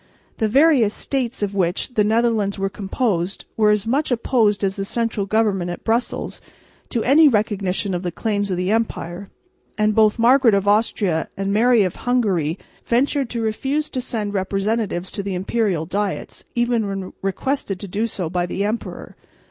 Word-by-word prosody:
The 220 - +1
various 260 -3 +4
states 260 -4 -2
of 200 -1 -2
which 190 +5 -1
the 215 - +3
Netherlands 220 -2 +1
were 195 0 -2
composed 195 -3 -2
were 215 -1 +3
as 210 0 +2
much 275 +7 0
opposed 225 -4 +1
as 195 0 0
the 195 - -3
central 220 -1 -2
government 200 -4 +1
at 175 - -6
Brussels 230 +2 -1 0.5
to 235 -3 -1
any 300 +4 +6
recognition 205 -4 0
of 175 - -2
the 180 -2 -3
claims 205 +1 -1
of 185 - -1
the 180 +2 0
empire; 200 -4 -2 0.5
and 215 0 +2
both 215 0 +4
Margaret 240 -1 +5
of 200 0 0
Austria 205 -5 +1
and 195 0 -1
Mary 230 +1 +4
of 185 - -2
Hungary 195 -10 0 0.3
ventured 265 +2 +1
to 235 -1 -3
refuse 270 +7 -1
to 255 - -2
send 215 -5 -3
representatives 195 -1 -1
to - - -4
the 195 -1 -3
imperial 190 -3 0
diets, 200 +3 -3
even 240 -3 +1
when 195 -1 -5
requested 195 +1 -2
to 200 - -5
do 210 +5 -1
so 185 -6 -3
by 175 +1 -1
the 195 +3 -2
emperor. 220 +3 -5
210 Hz, 170 wpm, -21 LUFS, 195-235 Hz, 0.5 s, any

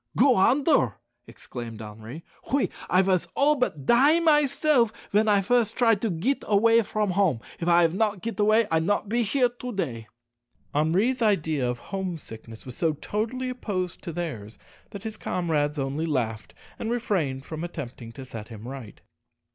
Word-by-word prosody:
"Go 265 +2 +6
onder!" 270 - +3 0.3
exclaimed 115 -3 -8
Henri; 110 +8 -9 0.3
"oui, 280 0 +1 0.2
I 185 +1 +4
vas 185 -2 +1
all 295 +2 +4
but 155 - -2
die 280 - +5
myself 295 -6 +3 0.2
ven 215 +2 +3
I 205 -2 +4
fust 235 +2 +1
try 235 -2 +4
to 215 +2 -1
git 205 +11 -1
away 225 +3 +4
from 210 -2 -1
hom'. 180 - +2 0.2
If 170 - -3
I 175 0 +5
have 165 0 +2
not 205 -1 0
git 230 -1 -4
away, 215 +2 +4
I 160 - +3
not 200 +4 0
be 240 +2 +1
here 245 +3 +2
to 245 +1 -7
day." 120 - -4 0.7
Henri's 190 - +1
idea 160 - +1
of 120 - -2 0.2
home 190 -3 -2
sickness 110 -5 -11
was 125 -2 -8
so 165 -2 +1
totally 225 - -3
opposed 185 -8 -4
to 170 - -6
theirs 140 -11 -5 0.3
that 200 - -9
his 220 -1 -5
comrades 155 -4 -1
only 140 +4 -2
laughed, 115 -7 -2 0.2
and 225 - -3
refrained 175 - -1
from 160 0 -6
attempting 125 -9 -7
to 135 +1 -9
set 110 -4 -8
him 110 0 -10
right. 130 -5 -9
185 Hz, 170 wpm, -26 LUFS, 145-230 Hz, 0.7 s, Go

